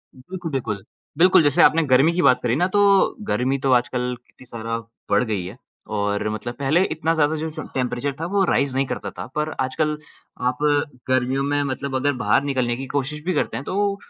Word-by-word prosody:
बिल्कुल, 170 +5 -7
बिल्कुल। 110 -7 -3 0.3
बिल्कुल, 180 -1 +6
जैसे 145 -2 +3
आपने 165 +1 +5
गर्मी 135 +6 +5
की 180 - +1
बात 130 -5 +5
करी 120 -1 +1
ना 175 +6 +2
तो 205 - +3 0.5
गर्मी 130 - +1
तो 135 0 0
आजकल 125 0 -2
कितनी 130 - -18
ज़्यादा 115 -1 -4 0.3
बढ़ - - +3
गई 95 -4 -1
है 100 +6 -8 0.4
और 105 +1 -1
मतलब 110 +3 -4
पहले 150 +7 +3
इतना 160 +1 0
ज़्यादा 155 -1 +2
जो 160 +1 -3
टेम्प 155 0 -8
टेम्परेचर 125 +2 -2
था 165 - -2
वो 195 - +4
राइज़ 140 -5 +1
नहीं 135 +1 +2
करता - - -4
था। - - -5
पर 150 +1 0
आजकल 150 +4 -1 0.5
आप 125 - -4 0.5
गर्मियों 130 +1 +1
में 145 +1 0
मतलब 135 0 -3
अगर 145 +2 +1
बाहर - - +3
निकलने 130 -4 0
की 135 - -5
कोशिश 150 +2 -2
भी 185 - 0
करते 150 - -1
हैं, - - -5
तो 200 +1 0
135 Hz, 205 wpm, -22 LUFS, 125-155 Hz, 0.5 s, बिल्कुल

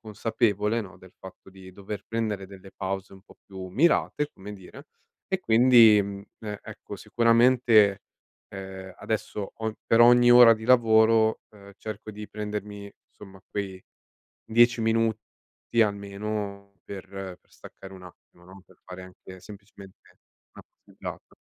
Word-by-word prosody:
consapevole, 110 0 -1
no, 100 -3 -11
del 95 -1 -17
fatto 95 0 -14
di 95 -1 -14
dover 100 +2 -8
prendere 110 -4 -3
delle 95 0 -14
pause 95 0 -5
un 95 -1 -15
po' - - -21
più 95 -1 -9
mirate, 150 - +1
come 100 +2 -10
dire, 95 -3 -13 0.4
e 190 -1 -1
quindi, 115 - +6
mhmm, 100 0 -7 0.2
e 105 -2 -6
ecco, - - -10
sicuramente, 115 -3 +3 0.5
ehm, 95 -1 -9
adesso 105 -2 -4
ogn 110 -1 -2
per 115 - +3
ogni 120 +1 +6
ora 120 -1 +9
di 110 - -10
lavoro, 110 -2 +4
ehm, 100 -1 -15
cerco 110 0 -8
di 105 0 -10
prendermi, 105 -1 -7 0.2
insomma, 95 -2 -15
quei 95 -2 -5 0.6
10 120 +1 +3
minuti 115 0 +1 0.6
almeno 100 0 -5
per 95 -2 -9 0.3
per - - -38
staccare 95 0 -14
un 95 - -13
attimo, 90 0 -18
no, 95 +1 -15
per - - -23
fare 90 0 -10
anche 95 0 -14
semplicemente 100 0 -14 0.6
una - - -14
passeggiata. - - -11
105 Hz, 140 wpm, -25 LUFS, 95-115 Hz, 0.6 s, ora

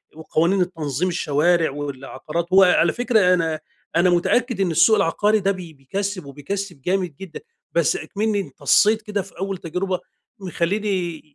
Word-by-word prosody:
وقوانين 165 +4 +1
التنظيم، 165 -2 -2
الشوارع 165 0 +1
والعقارات 145 +3 -5
وعلى 180 -3 +5
فكرة 220 -7 +3
أنا 165 -3 0 0.4
أنا 175 +2 +4
متأكد 205 +5 +1
إن 180 -3 +1
السوق 170 +7 +5
العقاري 210 +3 +2
ده 195 0 +1
بي 180 -4 -7
بيكَسّب 185 +6 -4
وبيكَسّب 150 +3 -6
جامد 180 -2 -1
جدًا، 190 +1 -9 0.3
بس 170 -2 +2
أكمِنّي 205 +6 -2
انتصّيت 215 +2 +2
كده 210 -1 -3
في 190 -2 -14
أول 195 0 -3
تجربة 180 +2 -3 0.4
مخلّيني 185 -2 -2
180 Hz, 140 wpm, -22 LUFS, 160-195 Hz, 0.4 s, وعلى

